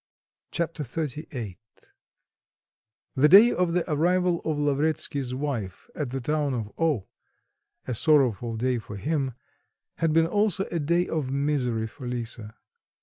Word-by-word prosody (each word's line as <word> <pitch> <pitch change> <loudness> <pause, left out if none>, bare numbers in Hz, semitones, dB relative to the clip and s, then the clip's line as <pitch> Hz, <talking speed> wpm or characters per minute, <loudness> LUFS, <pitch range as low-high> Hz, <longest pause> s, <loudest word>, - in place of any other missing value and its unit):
Chapter 165 -2 -2
XXXVIII 135 - -5 1.5
The 145 +2 +4
day 210 +7 +9
of 180 -2 0
the 175 -1 0
arrival 175 +2 +2
of 155 -2 -1
Lavretsky's 145 -2 0
wife 130 -10 -4
at 150 -5 -3
the 135 +2 -3
town 145 +1 0
of 110 -3 -4
O, 155 - +1 0.8
a 125 - -1
sorrowful 120 -4 +2
day 125 +1 0
for 105 -2 -9
him, 135 +3 -1 0.7
and 165 -1 +2
been 165 +1 +4
also 205 +2 +1
a 170 - -1
day 170 +4 +1
of 150 -5 -2
misery 135 -5 0
for 125 +3 -8
Lisa. 115 -3 -4
145 Hz, 135 wpm, -26 LUFS, 125-165 Hz, 1.5 s, day